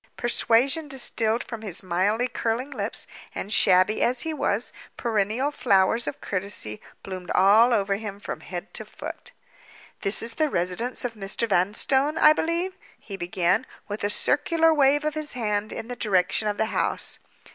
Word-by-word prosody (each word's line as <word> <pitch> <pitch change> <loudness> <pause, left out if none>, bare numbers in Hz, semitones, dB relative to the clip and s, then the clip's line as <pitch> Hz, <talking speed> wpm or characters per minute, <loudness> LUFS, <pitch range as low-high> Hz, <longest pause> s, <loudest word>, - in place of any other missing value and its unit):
Persuasion 250 +6 +2
distilled 235 -4 +1
from 230 -2 -7
his 200 -3 -4
mildly 195 +7 +1
curling 245 +4 -2
lips; - - -3 0.3
and, 205 - -4
shabby 185 +2 +4
as 245 0 +2
he 320 +4 -2
was, 235 -6 0 0.2
perennial 225 +4 0
flowers 230 -3 +2
of - - -4
courtesy 185 - -2 0.2
bloomed 185 -2 -7
all 215 +6 +6
over 200 -3 +1
him 205 -2 -7
from - - -6
head 180 +3 -7
to - - -4
foot. - - -9 0.7
"This 195 +3 0
is 230 0 -5
the 310 +3 +1
residence 185 +7 -2
of 240 - -2
Mr. 210 +2 -2
Vanstone, 265 - +1
I 305 -1 +7
believe?" 340 +4 -1 0.3
he 200 - -8
began, 180 +3 +1 0.2
with 205 0 -5
a 205 - +1
circular 325 +9 +2
wave 290 0 +3
of 305 - 0
his 305 0 -4
hand 210 -3 -1
in 225 - -6
the 245 - -5
direction 200 -1 +1
of 205 -1 -1
the 220 - +1
house. - - -1
220 Hz, 165 wpm, -25 LUFS, 195-260 Hz, 0.7 s, I